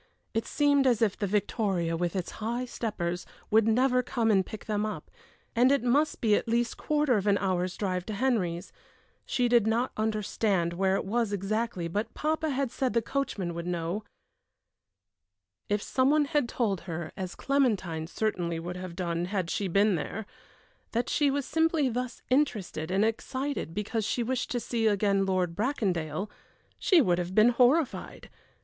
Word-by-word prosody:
It 225 - -1
seemed 285 -2 +3
as 235 -3 +3
if 205 -4 +2
the 205 - -2
victoria, 195 -4 0
with 175 +1 -2
its 185 -2 -2
high 235 +3 -1
steppers, 180 -8 -3 0.3
would 220 0 +5
never 250 +3 +3
come 230 -2 0
and 195 -2 +4
pick 215 +2 -9
them 210 -1 -1
up; 215 0 -5 0.4
and 250 +3 +5
it 280 -3 +2
must 280 +5 +2
be 220 -3 +3
at - - +1
least 235 +1 +1
quarter 295 -5 +1
of 200 0 -2
an 200 -1 +4
hour's 185 -2 -1
drive 185 -3 -2
to 215 - -3
Henry's. 195 -8 0 0.6
She 250 -2 +1
did 235 -3 +4
not 235 +3 +1
understand 210 -4 0
where 190 +2 +1
it - - -2
was 225 +1 0
exactly, 205 -2 -1
but 205 +6 -3
papa 315 +1 0
had 275 -3 -1
said 255 -3 -1
the 230 - +3
coachman 220 -10 -2
would 170 +1 -5
know. 175 +4 -2 1.7
If 205 0 0
some 260 0 +2
one 300 0 +4
had 290 -4 0
told 205 -8 0
her, 165 -1 -4
as 185 -2 -5
Clementine 200 - 0
certainly 175 -5 -1
would 175 +2 -5
have 180 -2 -7
done 170 -1 -1
had 185 -2 -2
she 200 - -1
been 200 +3 +3
there, 185 +6 -3 0.7
that 235 +1 0
she 290 -2 +3
was 280 -1 -1
simply 320 -3 +2
thus 250 +1 -4
interested 210 - 0
and 195 +3 +2
excited 260 - -3
because 215 +2 -1
she 235 +3 0
wished 250 +1 -2
to 245 - -1
see 230 -1 0
again 200 -1 +2
Lord 180 -3 0
Bracondale, 195 - -1 0.5
she 360 -5 +5
would 180 -8 +2
have 180 +1 -4
been 215 +2 +7
horrified. 250 +5 +1
215 Hz, 175 wpm, -28 LUFS, 185-250 Hz, 1.7 s, been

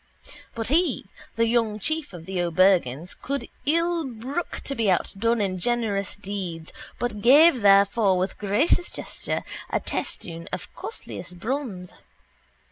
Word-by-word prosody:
But 225 0 -1
he, 340 +5 +2 0.3
the 230 - +3
young 225 -2 +1
chief 315 +8 -1
of 170 -3 -10
the 190 -1 -2
O'Bergan's, 175 -3 +2
could 280 +1 -4 0.2
ill 335 +2 +2
brook 265 +6 -4
to 275 - -4
be 225 -6 +1
outdone 225 +5 +1
in 190 -3 -1
generous 210 -2 -1
deeds 185 -5 -6 0.2
but 225 -4 -3
gave 275 +3 +7
therefor 200 0 +5
with 185 +2 -2
gracious 220 - +2
gesture - - -4 0.3
a - - +1
testoon 165 -1 -3
of - - -6
costliest 180 - -7
bronze. 215 -5 -4
210 Hz, 130 wpm, -25 LUFS, 185-260 Hz, 0.3 s, gave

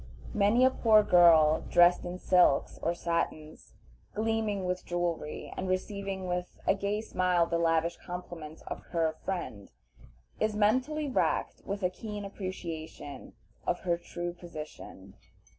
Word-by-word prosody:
Many 210 +5 +4
a 260 - +5
poor 215 -4 +5
girl 165 -5 +6
dressed 175 +1 +5
in 175 +1 -4
silks 180 -6 +3
or 170 - 0
satins, 170 -2 -3 0.4
gleaming 215 -3 0
with 180 0 -2
jewelry, 175 -3 -3
and 185 - -3
receiving 195 0 -3
with 180 0 -3
a - - +4
gay 200 +2 -2
smile 180 -5 +1
the 170 0 -1
lavish 165 0 +1
compliments 175 -3 -8
of - - -6
her 165 -2 +1
"friend," 170 - -4 0.7
is 215 -1 0
mentally 260 +9 +1
racked 260 - 0
with 200 0 -4
a 180 - +2
keen 210 +1 -6
appreciation 165 -8 -7 0.3
of 175 - 0
her 175 -2 +1
true 175 0 -5
position. 170 -3 -10
180 Hz, 135 wpm, -30 LUFS, 170-200 Hz, 0.7 s, girl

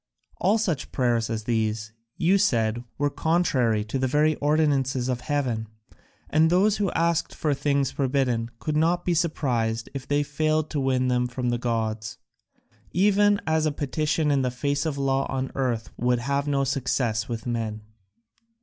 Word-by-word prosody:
All 200 +5 +2
such 180 -11 -2
prayers 120 -3 +1
as 110 -1 -3
these, 110 -1 -1 0.2
you 190 +4 +3
said, 115 - +1
were 145 0 0
contrary 135 -9 +1
to 110 +5 -3
the 130 - +1
very 150 +4 +3
ordinances 145 -4 +1
of 125 -1 -2
heaven, 125 -5 -1 0.6
and 160 +1 +3
those 195 +4 +3
who 200 -2 0
asked 165 0 0
for 150 -2 0
things 140 -1 0
forbidden 130 -4 0
could 150 +5 -3
not 170 +3 +2
be 175 - +2
surprised 125 -9 0
if 135 -1 -6
they 145 0 +2
failed 155 +1 0
to 150 - -1
win 130 -1 +1
them 125 0 +1
from 125 0 -3
the 120 - -1
gods. 110 -2 -2 0.7
Even 205 +2 +3
as 160 0 +1
a - - +1
petition 150 +2 0
in 140 -1 +2
the 130 - +1
face 140 +5 -1
of 145 -3 -3
law 135 0 +1
on 135 0 -2
earth 120 -4 -2
would 125 +1 +2
have 140 +4 -1
no 140 -1 +1
success 125 -4 -1
with 115 -1 -4
men." 110 -3 -3
135 Hz, 170 wpm, -25 LUFS, 120-155 Hz, 0.7 s, you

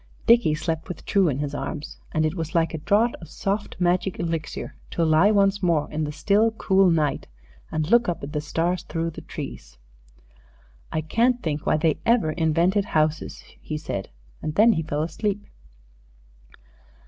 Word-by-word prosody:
Dickie 235 -10 +5
slept 160 0 -3
with 180 - -8
True 195 -3 +3
in 135 - -1
his 145 0 -3
arms, 150 +1 -5
and 155 -1 +1
it 155 - 0
was 165 -2 -5
like 165 0 +2
a 160 - -3
draught 215 +8 +2
of 165 - -11
soft 200 +1 -3
magic 180 +1 +1
elixir 165 -3 -3 0.2
to 170 - 0
lie 160 +5 +5
once 200 -1 +3
more 165 -5 +2
in 155 0 -1
the 150 - -4
still, 205 +8 +2
cool 195 -4 +3
night 155 -4 0 0.4
and 155 -1 -1
look 235 -3 +5
up 170 - -3
at 145 +2 -6
the 150 - -1
stars 170 +3 -1
through 165 -2 -3
the - - -9
trees. - - -8 1.3
"Can't 245 +4 +2
think 150 -2 -3
why - - +3
they 155 -1 +1
ever 230 -9 +3
invented 170 +5 +2
houses," 155 -2 -1 0.2
he 155 - -4
said, 100 -11 -5 0.3
and 155 - -4
then 225 +2 +6
he 160 - -1
fell 150 -1 -2
asleep. 205 +5 -2
165 Hz, 170 wpm, -24 LUFS, 155-195 Hz, 1.3 s, then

